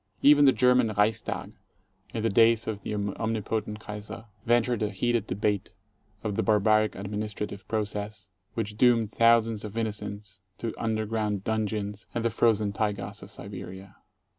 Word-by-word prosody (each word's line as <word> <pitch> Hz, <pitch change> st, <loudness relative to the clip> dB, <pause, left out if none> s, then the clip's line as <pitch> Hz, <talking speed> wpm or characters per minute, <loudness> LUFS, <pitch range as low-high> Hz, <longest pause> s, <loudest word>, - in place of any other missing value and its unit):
Even 145 Hz, 0 st, +7 dB
the 135 Hz, -, +8 dB
German 125 Hz, -3 st, +4 dB
Reichstag, 110 Hz, +2 st, 0 dB, 0.6 s
in 110 Hz, -, -3 dB
the 115 Hz, -, +2 dB
days 115 Hz, +2 st, +5 dB
of 105 Hz, -2 st, -4 dB
the 105 Hz, -, -4 dB
omni 110 Hz, +2 st, -2 dB
potent 105 Hz, 0 st, -3 dB
Kaiser, 105 Hz, +1 st, -8 dB, 0.2 s
ventured 120 Hz, 0 st, +2 dB
a 105 Hz, -, +1 dB
heated 115 Hz, +2 st, 0 dB
debate 100 Hz, +1 st, -1 dB, 0.5 s
of 105 Hz, -2 st, -2 dB
the -, -, +1 dB
barbaric 110 Hz, 0 st, +3 dB
admin 105 Hz, +2 st, -4 dB
istrative 105 Hz, -1 st, -5 dB
process 105 Hz, -2 st, -3 dB, 0.2 s
which 105 Hz, -2 st, -3 dB
doomed 115 Hz, -3 st, +4 dB
thousands 115 Hz, -2 st, +4 dB
of 105 Hz, +1 st, -7 dB
innocents 105 Hz, -3 st, -4 dB, 0.2 s
to 115 Hz, -2 st, -3 dB
under 110 Hz, -1 st, 0 dB
ground 105 Hz, -3 st, -1 dB
dungeons 105 Hz, -2 st, -2 dB
and 115 Hz, -1 st, -1 dB
the 115 Hz, -, +2 dB
frozen 110 Hz, -2 st, +2 dB
taigas 105 Hz, -1 st, -2 dB
of -, -, -10 dB
Siberia. 95 Hz, 0 st, -9 dB
110 Hz, 155 wpm, -28 LUFS, 105-115 Hz, 0.6 s, the